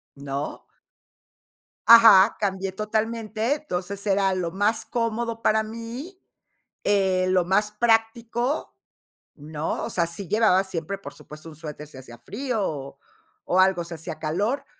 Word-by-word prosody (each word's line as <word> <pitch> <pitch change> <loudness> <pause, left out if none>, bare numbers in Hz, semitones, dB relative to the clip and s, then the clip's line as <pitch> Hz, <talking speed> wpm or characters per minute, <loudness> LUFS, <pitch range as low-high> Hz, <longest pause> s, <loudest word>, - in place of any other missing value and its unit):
¿no? 140 +1 -5 1.2
Ajá, 225 -3 +8
cambié 195 -1 -2
totalmente, 220 +3 -1
entonces 200 -7 -5
era 195 -1 +2
lo 175 -2 -3
más 205 +3 0
cómodo 230 0 -2
para 220 0 +2
mí, 230 - -8 0.7
eh, 190 -2 +2
lo 185 -1 +2
más 210 +3 +1
práctico, 230 +4 0 0.6
¿no? 150 +1 -4
O - - -5
sea, 170 -2 +1
sí 170 +2 -6
llevaba 205 -3 +3
siempre, 185 +1 -4
por 195 - -10
supuesto, 155 +2 -13
un 155 - -12
suéter, 150 -1 -8
si 140 - -14
hacía 120 -2 -11
frío, 230 - -4
o 140 -2 -7 0.5
o 185 - +2
algo, 185 -2 +3
si 170 0 -8
hacía 160 - -7
calor, 200 - -1
200 Hz, 140 wpm, -24 LUFS, 170-225 Hz, 1.2 s, Ajá